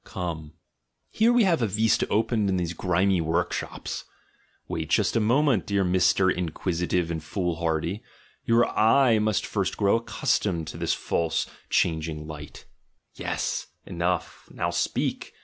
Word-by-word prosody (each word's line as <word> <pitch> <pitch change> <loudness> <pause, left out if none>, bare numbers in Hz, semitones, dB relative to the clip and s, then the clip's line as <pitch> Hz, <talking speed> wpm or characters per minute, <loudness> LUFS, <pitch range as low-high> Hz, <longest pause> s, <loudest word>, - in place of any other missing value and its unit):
Come! 80 -4 -5 0.6
Here 225 +2 +3
we 240 -1 +4
have 170 -8 +2
a 115 - +2
vista 110 +3 +2
opened 110 -1 +1
into 95 -1 +1
these 85 -1 -2
grimy 90 +1 +1
work 80 +1 0
shops. - - -5 0.6
Wait 80 -1 -4
just 100 +3 +2
a - - +4
moment, 120 - +2
dear 100 -2 +1
Mr. 95 +1 +3
Inquisitive 90 0 -1
and 80 -2 -4
Foolhardy; 85 +1 -2 0.4
your 115 +1 +3
eye 115 +1 +4
must 105 -1 +1
first - - -2
grow 100 +2 +3
accustomed 95 -6 -1
to - - -8
this - - 0
false 80 -1 -1 0.2
changing 80 -2 0
light 75 -1 -9 0.3
— - - -50
Yes! - - -3 0.2
Enough! 90 0 -3
Xow 85 0 -2
speak! 85 - -2
90 Hz, 145 wpm, -26 LUFS, 85-110 Hz, 0.6 s, we